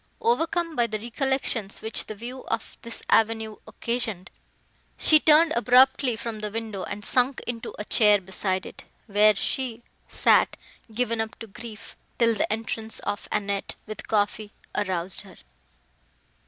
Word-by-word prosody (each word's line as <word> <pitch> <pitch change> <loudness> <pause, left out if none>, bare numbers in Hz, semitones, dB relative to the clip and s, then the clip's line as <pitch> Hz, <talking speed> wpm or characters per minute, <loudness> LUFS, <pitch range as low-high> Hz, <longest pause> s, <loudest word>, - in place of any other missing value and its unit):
Overcome 345 -8 0
by 240 -3 +2
the 215 -1 -3
recollections, 235 -2 -2
which 220 0 -1
the 215 - -6
view 245 +5 -8
of 225 0 -3
this 235 - -4
avenue 220 -1 +2
occasioned, 220 -4 -3 0.7
she 310 - +6
turned 315 +2 +6
abruptly 250 +1 +4
from 225 -1 -5
the 210 0 -3
window, 220 -2 -4
and 205 +2 -6
sunk 255 +1 +3
into 230 -2 -5
a 210 - -5
chair 210 -2 +5
beside 190 0 -2
it, - - -10 0.2
where 210 0 +4
she 240 +3 -2 0.2
sat, - - +3 0.3
given 230 0 0
up 220 0 -5
to 225 - -8
grief, 220 +1 -11 0.2
till 230 -1 +4
the 210 - -1
entrance 225 0 -3
of 205 - -4
Annette, 200 -1 -2
with 215 -1 -8
coffee, 210 0 0 0.2
aroused 185 -3 0
her. 195 -3 -14
225 Hz, 145 wpm, -25 LUFS, 210-245 Hz, 0.7 s, she